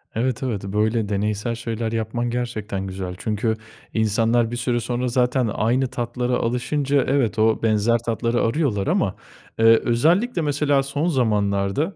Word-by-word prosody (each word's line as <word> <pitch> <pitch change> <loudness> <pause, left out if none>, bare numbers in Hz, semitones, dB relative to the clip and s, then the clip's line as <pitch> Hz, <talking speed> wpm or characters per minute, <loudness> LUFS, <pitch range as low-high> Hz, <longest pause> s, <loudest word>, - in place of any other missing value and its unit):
Evet, 125 +2 -1
evet, 115 -7 -2
böyle 105 +2 0
deneysel 105 +3 -1
şeyler 115 -1 -3
yapman 115 +2 -2
gerçekten 110 -5 -3
güzel. 95 -1 -5
Çünkü 110 +2 -1 0.4
insanlar 115 +2 +2
bir - - -3
süre 120 0 0
sonra 120 +2 -2
zaten 125 0 +1
aynı 125 +4 +1
tatlara 125 0 -2
alışınca, 135 +4 0
evet, 125 -6 +1
o 110 +1 +2
benzer 110 +1 +3
tatları 115 +1 -1
arıyorlar 115 -5 0
ama, - - +1 0.4
eee, 115 - +3 0.2
özellikle 170 - +2
mesela 145 -2 +1
son 140 +4 -2
zamanlarda, 105 - 0
115 Hz, 140 wpm, -22 LUFS, 110-130 Hz, 0.4 s, benzer